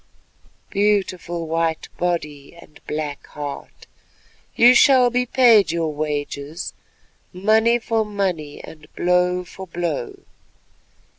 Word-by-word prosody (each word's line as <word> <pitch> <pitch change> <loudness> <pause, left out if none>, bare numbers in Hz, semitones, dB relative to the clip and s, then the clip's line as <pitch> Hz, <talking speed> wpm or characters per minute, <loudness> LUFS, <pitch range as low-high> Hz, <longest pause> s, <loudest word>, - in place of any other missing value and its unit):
Beautiful 190 -4 0
white 165 0 -1
body 150 -5 -3
and 150 -3 -17
black 150 -2 -5
heart, 145 -1 -8 0.7
you 245 +2 +7
shall 255 -1 +5
be 250 +1 0
paid 230 -9 +5
your 165 -2 -2
wages, 150 +2 -4 0.6
money 220 +5 +3
for 225 -1 -1
money, 185 -8 -3
and 150 -1 -13
blow 180 0 +1
for 190 +1 -11
blow. 170 -7 -3
175 Hz, 100 wpm, -21 LUFS, 155-210 Hz, 0.7 s, you